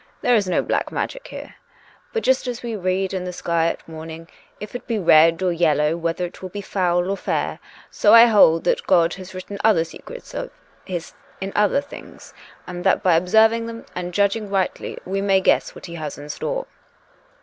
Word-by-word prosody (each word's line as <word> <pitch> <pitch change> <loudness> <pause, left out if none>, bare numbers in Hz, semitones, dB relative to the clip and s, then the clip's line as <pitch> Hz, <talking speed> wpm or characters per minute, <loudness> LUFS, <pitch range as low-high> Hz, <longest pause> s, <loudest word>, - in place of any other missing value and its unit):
There 245 - +3
is 205 -4 +1
no - - +1
black - - -1
magic - - -4
here. - - -9 0.6
But, 455 -2 -2
just 260 0 +2
as 245 -1 -5
we 235 -2 -3
read 190 0 -1
in 185 -1 -2
the 180 - -4
sky 170 -2 0
at - - -4
morning, 160 0 -9 0.3
if 210 - -8
it 245 - -7
be 230 - -1
red 165 -1 +5
or 185 - +2
yel 165 -3 +2
low, 150 +2 +1
whether 170 +1 -2
it 175 - -10
will 185 - -6
be 205 - -6
foul 180 -3 0
or - - 0
fair, - - -2 0.3
so 210 - +3
I 230 0 +10
hold 200 -8 +5
that - - 0
God 170 -2 +4
has 185 0 -10
written 200 +2 -7
other 210 -7 +4
secrets - - -11
of - - -4 0.4
His 175 -3 -5 0.3
in 195 0 -4
other 210 +7 +3
things; 285 - -13 0.3
and 175 -1 -7
that - - +2
by 185 -3 +4
observing 220 +6 +3
them 230 0 -8
and 180 0 -4
judging 200 +2 0
rightly 195 -2 -2
we 195 +2 -2
may 195 -1 +3
guess 190 - +1
what - - -10
He 170 - -9
has 155 -3 -6
in 145 +1 -10
store. - - -3
185 Hz, 205 wpm, -22 LUFS, 170-215 Hz, 0.6 s, I